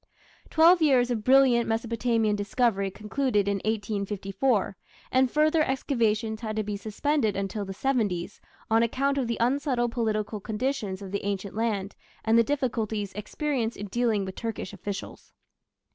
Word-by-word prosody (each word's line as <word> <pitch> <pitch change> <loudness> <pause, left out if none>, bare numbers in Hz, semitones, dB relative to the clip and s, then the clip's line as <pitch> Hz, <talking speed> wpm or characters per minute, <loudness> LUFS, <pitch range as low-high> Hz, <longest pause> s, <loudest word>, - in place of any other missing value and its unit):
Twelve 335 +2 +6
years 255 -5 +4
of 220 -3 -2
brilliant 255 -2 +5
Mesopotamian 225 -1 +1
discovery 205 -1 0
concluded 210 +1 -1
in 200 0 +1
1854, 205 +1 -1 0.4
and 260 0 +3
further 310 +3 +3
excavations 230 -6 0
had 215 -2 -3
to 215 - 0
be 210 0 -3
suspended 220 +3 0
until 200 +1 -3
the 195 - -6
"seventies" 205 -8 -1 0.3
on 225 +1 +3
account 275 +4 +1
of 255 - -1
the 235 - -2
unsettled 250 -1 +1
political 215 -2 -1
conditions 210 -3 -3
of 190 - -8
the 200 - -3
ancient 200 -1 -3
land 210 -3 -1 0.3
and 220 0 +3
the 230 - +6
difficulties 225 -7 -2
experienced 235 +3 -2
in 205 - -5
dealing 225 -2 +1
with 190 - -6
Turkish 225 -3 -5
officials. 200 0 -7
225 Hz, 145 wpm, -27 LUFS, 205-255 Hz, 0.4 s, Twelve